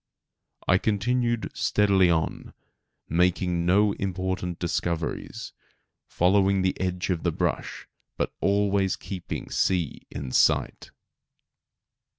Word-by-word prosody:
I 90 - +4
continued 120 +3 0
steadily 100 -3 +3
on, 80 -1 -1 0.5
making 90 +1 +1
no 100 +3 +4
important 95 -2 -3
discoveries, 85 -1 -3 0.5
following 95 +1 +2
the 95 - +1
edge 90 0 -1
of 85 - -1
the - - 0
brush, - - -3 0.3
but - - -1
always 100 -1 +2
keeping 95 -3 -6
the - - -10
sea 90 -6 0
in 70 -3 -6
sight. - - +2
95 Hz, 105 wpm, -26 LUFS, 90-100 Hz, 0.5 s, I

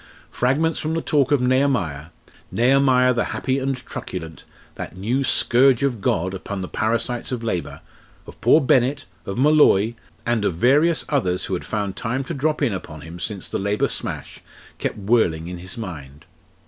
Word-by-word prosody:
Fragments 150 +6 +1
from 160 +1 -2
the 165 - 0
talk 145 -2 +2
of 145 - +4
Nehemiah 125 - +1 0.5
Nehemiah 125 0 +4
the 120 - 0
happy 130 0 0
and 135 0 -1
truculent, 80 -9 -7 0.3
that 90 - -8
new 120 +8 0
"scourge 130 0 +4
of 125 -7 0
God" 95 +1 0
upon 95 +1 -5
the 90 - -4
parasites 115 +5 -1
of 120 -2 -3
Labour 90 -7 -3 0.4
of - - -13
poor - - +6
Bennett, 135 +1 +2 0.2
of 100 - -4
Molloy, 130 -7 +4 0.3
and 120 -3 +1
of 95 - 0
various 145 - +3
others 95 - 0
who - - -4
had 90 - -3
found 100 -3 -3
time 125 +6 -2
to 150 - -5
drop 150 +1 0
in 120 -7 +1
upon 80 -5 -7
him 85 +2 -9
since 100 0 -4
the - - -3
Labour 100 +1 +1
smash, - - -5 0.4
kept - - -2
whirling 95 -7 +1
in 90 0 -6
his 90 +3 -8
mind. 75 -10 -8
120 Hz, 175 wpm, -22 LUFS, 95-135 Hz, 0.5 s, poor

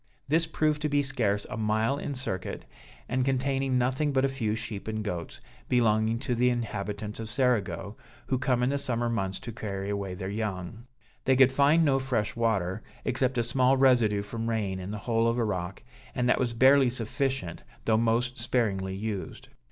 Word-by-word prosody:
This 160 +3 +2
proved 155 -1 0
to 150 - 0
be 145 0 +2
scarce 110 -7 0
a 125 - -6
mile 110 +5 +1
in 145 - -4
circuit, 95 -8 -4 0.4
and 125 +1 0
containing 135 0 +1
nothing 130 +4 +1
but 135 -1 +2
a - - +1
few 115 -5 -1
sheep 110 -2 -5
and 110 0 -2
goats, 90 -5 -5 0.3
belonging 110 -2 +3
to 135 -3 -1
the 125 +1 +3
inhabitants 105 -3 -3
of 110 -1 -3
Cerigo, 115 -5 0 0.3
who 130 - 0
come 125 -2 +1
in 125 - +2
the 140 - 0
summer 120 -3 -1
months 95 -5 -2
to 120 - -6
carry 100 -3 -4
away 100 -2 -3
their 95 0 -5
young. 105 +2 -4 0.4
They 135 - +4
could 130 0 +6
find 145 +5 +4
no 135 -2 +3
fresh 125 -6 -1
water, 105 -4 0 0.2
except 130 0 0
a 120 - +2
small 130 +3 +3
residue 120 -6 +4
from 115 +2 -4
rain 100 -4 -1
in 95 +1 -6
the 105 - -4
hole 115 +2 +1
of 115 +1 +1
a 120 - +2
rock, 95 -1 -3 0.3
and 125 0 +1
that - - +3
was 120 -2 -1
barely 130 +2 +6
sufficient 125 - -2 0.2
though 110 - +3
most 120 +3 +1
sparingly 95 -6 0
used. 105 -1 -5
115 Hz, 190 wpm, -28 LUFS, 105-130 Hz, 0.4 s, could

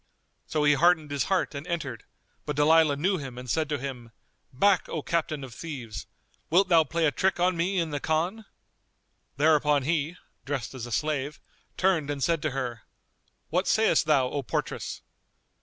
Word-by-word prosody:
So 155 -1 0
he 145 0 +5
heartened 160 0 +3
his 140 -2 0
heart 190 -4 0
and 140 +3 -7
entered; 140 -10 -4 0.4
but 150 - -2
Dalilah 155 0 +5
knew 185 +5 +1
him 135 -4 -7
and 125 0 -8
said 155 +4 0
to 150 - 0
him, 125 -3 -6 0.4
"Back, 190 +8 +2
O 155 - -3
captain 155 -4 -1
of 130 -3 -8
thieves! 125 -8 -7 0.4
Wilt 185 +3 +4
thou 165 -2 +6
play 165 +2 0
a 150 - +3
trick 190 +5 0
on 180 +1 +2
me 180 +4 0
in 165 -3 0
the 145 - -2
Khan?" 175 +9 -1 0.9
Thereupon 150 -1 +3
he 160 +3 -1 0.3
(dressed 135 -2 -4
as 125 -2 -6
a - - -9
slave) 150 +1 -1 0.4
turned 180 -6 +2
and 140 -2 -2
said 165 0 +1
to 155 - 0
her, 125 -4 -4 0.7
"What 180 +3 +1
sayest 220 -8 +3
thou, 140 -4 +4
O 145 - -2
portress?" 120 - -4
150 Hz, 175 wpm, -27 LUFS, 140-170 Hz, 0.9 s, thou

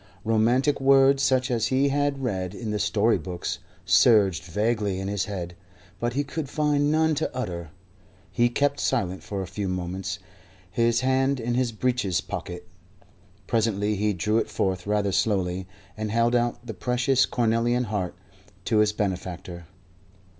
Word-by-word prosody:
Romantic 120 +6 +2
words, 135 0 +5
such 130 -1 +2
as 115 -1 +1
he 135 +2 +2
had 145 -1 0
read 95 -5 -2
in 110 -1 -4
the 105 - -1
story 105 +1 +2
books, 90 +2 -4 0.3
surged 95 -2 +4
vaguely 105 +1 -1
in 95 - -4
his 100 -1 -1
head, 90 -4 -5 0.4
but 120 0 -1
he 145 +3 0
could 145 0 -5
find 145 -1 +1
none 160 0 +3
to 145 - -1
utter. 85 -10 -4 0.6
He 120 +6 +2
kept 140 +3 0
silent 95 -8 -1
for 100 -2 -4
a - - -5
few 100 +3 -4
moments, 90 +2 -3 0.5
his 115 +3 +2
hand 130 +1 +1
in 120 +1 -2
his 125 -1 +1
breeches 115 -5 0
pocket. 90 0 -6 0.8
Presently 105 -2 0
he 105 +1 +1
drew 105 +4 +1
it - - -2
forth 95 -1 -1
rather 105 -1 +1
slowly, 95 -3 0 0.3
and 110 0 -3
held 115 +2 +2
out 120 0 0
the 115 - -5
precious 125 +5 +1
cornelian 120 +1 +1
heart 105 -6 -3 0.5
to 110 - +1
his 105 0 +3
benefactor. 90 -3 -4
110 Hz, 155 wpm, -25 LUFS, 95-125 Hz, 0.8 s, words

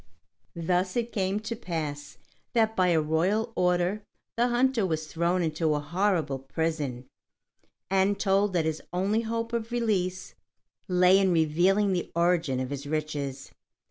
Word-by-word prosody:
Thus 180 +2 0
it 235 0 -1
came 195 0 -1
to 220 +2 -4
pass 150 -9 -5 0.4
that 220 -1 +2
by 185 -1 +3
a 170 -2 +3
royal 185 +9 0
order 180 +3 +1 0.3
the 240 +1 +2
hunter 245 -1 +2
was 160 -4 -1
thrown 170 +3 0
into 155 -1 0
a - - 0
horrible 160 -3 0
prison, 140 -3 -3 0.8
and 195 +1 +2
told 195 0 +2
that 170 -3 +1
his 160 -1 -2
only 195 +5 +1
hope 230 +1 -3
of 230 0 -2
release 195 -6 -1 0.5
lay 180 0 +5
in 190 -2 +3
revealing 175 +5 +3
the 175 - -3
origin 170 -6 +2
of 130 +1 -3
his 140 0 -5
riches. 145 -3 -3
180 Hz, 145 wpm, -27 LUFS, 155-205 Hz, 0.8 s, lay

